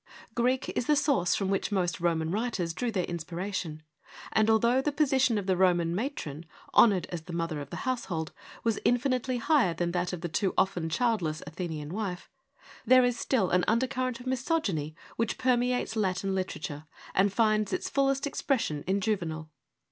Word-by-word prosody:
Greek 250 +3 +1
is 245 - -2
the 300 - +5
source 275 - +2
from 195 -2 -1
which 195 +2 0
most 180 -3 0
Roman 165 -2 0
writers 200 -5 -1
drew 235 +7 -2
their 190 -4 0
inspiration, 170 -1 -4 0.5
and 220 0 +3
although 235 +4 +4
the 295 - 0
position 265 -5 +2
of 200 - -2
the 190 -1 +2
Roman 175 -2 +3
matron, 170 - -4 0.3
honoured 200 -6 +5
as 175 -2 -4
the 170 +2 -9
mother 165 -3 -2
of 140 - -8
the - - -6
household, 180 -11 -2 0.3
was 225 -2 +1
infinitely 250 0 +1
higher 245 - +3
than 170 +1 -1
that 180 0 -1
of 180 -3 -5
the 175 - -2
too 185 +3 -1
often 180 -4 +1
childless 180 -7 0
Athenian 155 -1 -5
wife, 195 -4 -4 0.5
there 255 +2 +6
is 245 -1 0
still 220 -9 +1
an 180 0 +3
undercurrent 255 +1 0
of 245 - -11
misogyny 255 - -1 0.2
which 230 -1 -1
permeates 250 -2 +1
Latin 195 -2 0
literature, 155 -5 -4 0.3
and 195 +1 +3
finds 215 -1 +2
its - - -2
fullest 275 0 +1
expression 245 - -1
in 195 +1 +1
Juvenal. 165 -7 -2
195 Hz, 170 wpm, -29 LUFS, 170-245 Hz, 0.5 s, there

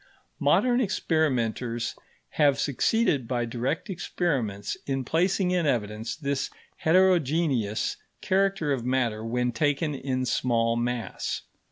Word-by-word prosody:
Modern 250 0 +3
experimenters 125 - 0 0.4
have 145 -2 +3
succeeded 145 - +1
by 120 -1 0
direct 125 - -2
experiments 135 - -2
in 135 -2 -1
placing 180 +4 +1
in 175 -3 +1
evidence 110 -3 -1
this 140 -2 -2 0.3
heterogeneous 160 - +2 0.2
character 195 -5 +1
of 125 -4 -2
matter 120 -4 0
when 125 +2 0
taken 145 +5 0
in 130 -2 -2
small 115 -2 +1
mass. 120 -3 -2
135 Hz, 110 wpm, -27 LUFS, 120-165 Hz, 0.4 s, Modern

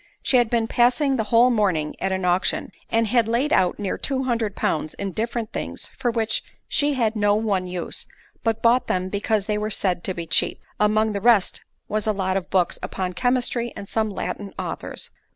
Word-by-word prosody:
She 260 - +4
had 240 -2 +3
been 230 -1 +1
passing 250 +4 +3
the 220 - 0
whole 235 +3 +5
morning 185 -9 +1
at 190 - 0
an 190 -1 -1
auction, 180 +1 +1 0.2
and 230 0 +2
had 230 0 +2
laid 245 +6 +1
out 180 - +3
near 200 -3 -3
two 265 -1 -1
hundred 230 -5 -1
pounds 155 0 -1
in 200 -1 -3
different 225 +2 -3
things - - -5
for 245 - 0
which 225 -1 0 0.2
she 290 -1 +1
had 230 -3 +1
no 205 -1 +3
one 200 -4 0
use, 180 -1 -4 0.4
but 225 -1 0
bought 240 +2 +4
them 185 0 0
because 205 +1 0
they 210 0 0
were 210 0 -2
said 185 -4 0
to 190 - -2
be 170 - -4
cheap—among 210 +6 +1
the 200 -1 -3
rest 225 -4 +3 0.3
was 215 0 -1
a 215 - +3
lot 190 -2 -1
of 190 -2 -2
books 180 -3 +1
upon 185 -1 -3
chemistry, 245 +2 0
and 200 - -7
some 220 +1 0
Latin 195 0 -5
authors. - - -5
215 Hz, 200 wpm, -23 LUFS, 190-235 Hz, 0.4 s, whole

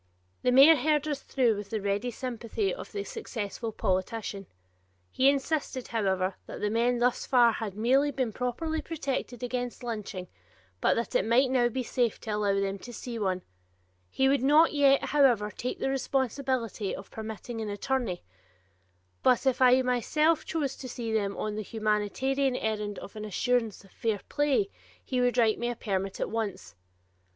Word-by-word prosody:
The 250 - +2
mayor 280 +5 +8
heard 300 +2 +1
us 290 -2 -2
through 245 -5 +1
with 205 -1 -7
the 220 - -2
ready 200 +4 -1
sympathy 245 - -3
of - - -8
the 405 - -3
successful 230 - -5
politician. 195 0 -2 0.6
He 265 +1 +4
insisted, 280 -2 -1
however, 190 -4 0
that - - -7
the 210 - -1
men 240 +2 +2
thus 245 +1 +1
far 245 -3 +5
had 215 -3 -4
merely 265 +6 +3
been 260 -6 -2
properly 315 +6 -2
protected 275 -6 -4
against 245 0 -3
lynching, 210 -5 -5 0.5
but - - +3
that 230 -2 -2
it - - +3
might 250 +5 +3
now 245 -2 +3
be 255 +2 -2
safe 240 -2 0
to 220 - -5
allow 205 -1 +1
them 195 0 -2
to 245 - -9
see 240 0 -6
some 215 - -2
one; 185 -1 0 0.7
he 265 - +2
would 275 -1 +3
not 300 +5 +5
yet, 275 -2 +4
however, 245 -8 +3
take 250 - -4
the - - -1
responsibility 260 -5 -1
of 195 - -11
permitting 220 +1 -6
an 215 - -3
attorney, 205 -2 -2 1.0
but 250 +1 +3
if 265 -1 +2
I 255 0 +6
myself 300 +6 +2
chose 290 -5 -2
to 255 - -7
see 230 -2 -4
them 200 -2 0
on 215 - -2
the 215 - -3
humanitarian 225 +6 0
errand 210 -3 -2
of 200 - -9
an 215 - -6
assurance 225 +1 0
of 195 - -19
fair 220 -4 -2
play, 295 +7 +1 0.3
he 255 -2 0
would 245 0 +2
write 225 -3 +3
me 240 - -1
a 240 - -3
permit 195 -3 -3
at - - -2
once. 205 - -3
240 Hz, 175 wpm, -28 LUFS, 210-265 Hz, 1.0 s, mayor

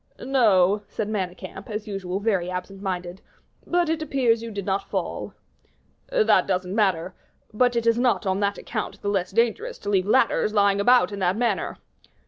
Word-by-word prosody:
"No," 210 -7 +3
said 205 0 -4
Manicamp, 190 -1 -5
as 210 0 -5
usual 195 -2 -3
very 195 -5 0
absent 185 +2 -6
minded, 180 -1 -4 0.5
"but 350 -1 +2
it 320 0 -1
appears 255 -6 +1
you 230 - -6
did 200 -3 -5
not 195 0 -2
fall." - - -4 0.7
"That - - +3
doesn't 185 -1 -1
matter; 190 -4 +1 0.4
but 245 +2 +2
it 235 -1 0
is 230 0 +3
not 245 -3 +1
on 190 0 0
that 200 0 0
account 210 -3 -5
the 205 - 0
less 190 -3 0
dangerous 240 - 0
to 205 - -6
leave 190 -1 +2
ladders 220 -2 +2
lying 200 -1 +3
about 245 +1 +4
in 200 - -5
that 185 +1 +1
manner." 230 -6 -1
205 Hz, 175 wpm, -24 LUFS, 190-230 Hz, 0.7 s, about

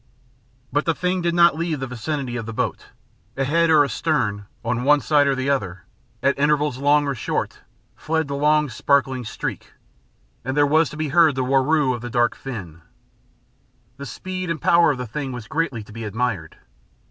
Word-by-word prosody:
But 145 +1 +1
the 165 - +1
thing 180 +2 -1
did 170 0 0
not 170 0 +6
then 155 - -8
leave 165 -3 -1
the 135 - -3
vicinity 130 +1 -4
of 115 -2 -4
the 115 - -5
boat. - - -2 0.5
Ahead 165 +5 +2
or 155 -2 +6
astern, 110 -10 -1 0.2
on 120 +1 -1
one 145 +2 +5
side 145 -1 +3
or 135 - +2
the 130 +1 0
other, 95 -9 -2 0.4
at 140 0 +2
intervals 145 -2 +1
long 145 +1 +3
or 140 - -1
short, 125 - -3 0.4
fled 160 -1 -1
the 140 - -4
long 150 +1 +3
sparkling 130 +1 +1
streak, 110 - -6 0.7
and 130 +3 -3
there 145 - +5
was 155 +2 +3
to 150 - -9
be 155 -1 -2
heard 160 -1 +4
the 130 - 0
whirroo 135 +1 +2
of 120 - -5
the 120 - -6
dark 120 -1 +2
fin. 95 -11 -8 1.2
The 140 0 -7
speed 185 +8 -5
and 165 -2 -2
power 170 +3 +4
of 145 - 0
the 125 - -4
thing 135 +3 -5
was 120 -3 -7
greatly 140 -8 -2
to 105 - -14
be 115 +1 -7
admired. 105 -6 -3
140 Hz, 195 wpm, -22 LUFS, 120-155 Hz, 1.2 s, not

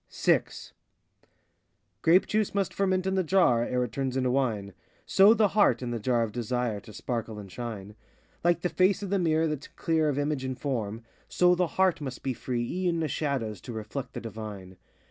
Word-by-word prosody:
VI - - +3 1.6
Grape 175 +4 +5
juice 215 -1 0
must 195 -2 0
ferment 185 -1 +1
in 190 - 0
the 190 -1 +2
jar, 160 -9 +3
Ere 125 +1 0
it 120 - -4
turns 135 +1 -2
into 130 -1 +1
wine; 110 -7 -1 0.3
So 200 +4 +6
the 215 -2 +3
heart, 205 -9 +3
in 120 - -3
the 120 - -2
jar 120 +1 +1
of 110 - -3
Desire, 120 -1 -2
To 100 - -13
sparkle 115 -1 -4
and 100 -2 -9
shine. 105 -3 -6 0.5
Like 175 0 +2
the 180 - 0
face 190 +3 +2
of 195 - -5
the 200 - +2
mirror 160 -2 +2
that 150 -3 -3
's - - -14
clear 160 -2 +1
Of 140 - -1
image 145 -2 -1
and 130 -1 -3
form, 115 -5 -3 0.3
So 180 0 +4
the 180 0 +1
heart 185 -4 +3
must 130 -3 -6
be 135 - -1
free 120 -1 -3
e'en 175 -1 -1
of 150 - -2
shadows 120 - -2
To 120 - -8
reflect 110 +5 -6
the - - -5
divine. 105 -4 -8
130 Hz, 205 wpm, -28 LUFS, 115-175 Hz, 1.6 s, So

